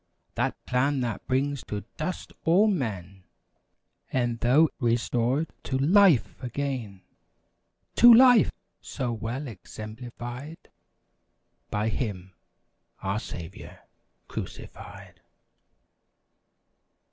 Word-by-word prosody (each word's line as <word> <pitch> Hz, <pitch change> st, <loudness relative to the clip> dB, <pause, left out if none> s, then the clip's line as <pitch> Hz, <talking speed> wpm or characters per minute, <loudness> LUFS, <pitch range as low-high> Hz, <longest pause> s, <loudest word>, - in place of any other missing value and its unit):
That -, -, -1 dB
plan 135 Hz, +2 st, +1 dB
that 120 Hz, -3 st, -4 dB
brings 140 Hz, +1 st, 0 dB
to 105 Hz, -1 st, -5 dB
dust 170 Hz, +4 st, -5 dB
all 180 Hz, +6 st, +5 dB
men. 100 Hz, -, -2 dB, 0.9 s
E'en 120 Hz, -2 st, 0 dB
though 130 Hz, +8 st, +4 dB
restored 120 Hz, +4 st, 0 dB
to 130 Hz, -, -1 dB
LIFE 170 Hz, -, +4 dB
again!" 125 Hz, -7 st, -4 dB, 0.9 s
To 240 Hz, -, +9 dB
LIFE! 245 Hz, -1 st, +7 dB, 0.3 s
So 125 Hz, -4 st, -3 dB
well 115 Hz, +6 st, -4 dB
exemplified 120 Hz, -, -9 dB, 1.0 s
By 105 Hz, +1 st, -1 dB
Him—our 95 Hz, -1 st, -6 dB
Saviour, 85 Hz, -7 st, -9 dB, 0.5 s
crucified! -, -, -9 dB
125 Hz, 80 wpm, -27 LUFS, 110-145 Hz, 1.0 s, To